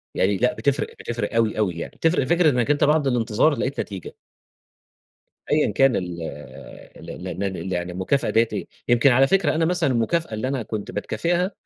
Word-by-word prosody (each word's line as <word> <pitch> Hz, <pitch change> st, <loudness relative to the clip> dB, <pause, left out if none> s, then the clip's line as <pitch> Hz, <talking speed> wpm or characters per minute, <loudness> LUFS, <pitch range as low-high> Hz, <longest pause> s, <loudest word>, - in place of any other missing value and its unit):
يعني 95 Hz, +1 st, +2 dB
لأ 125 Hz, +4 st, +2 dB
بتفرق، 140 Hz, +1 st, 0 dB
بتفرق 115 Hz, -2 st, -4 dB
أوي، 110 Hz, -2 st, +1 dB
أوي 100 Hz, -5 st, +1 dB
يعني. 85 Hz, -, -6 dB
بتفرق 165 Hz, -3 st, +1 dB
فكرة 170 Hz, +3 st, +3 dB
إنّك 125 Hz, 0 st, +1 dB
أنت 145 Hz, -, +1 dB
بعد 150 Hz, -1 st, +3 dB
الانتظار 120 Hz, +4 st, +2 dB
لقيت 140 Hz, +2 st, -2 dB
نتيجة. 95 Hz, -5 st, -6 dB, 1.4 s
أيًا 150 Hz, 0 st, +3 dB
كان 135 Hz, -2 st, +3 dB
ال 90 Hz, -2 st, -4 dB, 0.8 s
ال -, -, -11 dB
ال -, -, -7 dB
ال 95 Hz, +4 st, -4 dB
ال 95 Hz, -1 st, -4 dB
يعني 90 Hz, 0 st, -3 dB
المكافأة 95 Hz, +10 st, 0 dB
ديّة 115 Hz, +1 st, +3 dB
إيه، 100 Hz, -, -4 dB, 0.2 s
يمكن 120 Hz, +3 st, +4 dB
على 135 Hz, +2 st, +5 dB
فكرة 195 Hz, 0 st, +2 dB
أنا 160 Hz, +1 st, +2 dB
مثلًا 175 Hz, -5 st, +1 dB
المكافأة 125 Hz, +5 st, 0 dB
اللي 110 Hz, +4 st, -2 dB
أنا 130 Hz, -3 st, -2 dB
كنت 105 Hz, -2 st, -5 dB
باتكافئها، 175 Hz, -, -1 dB
125 Hz, 185 wpm, -23 LUFS, 105-150 Hz, 1.4 s, على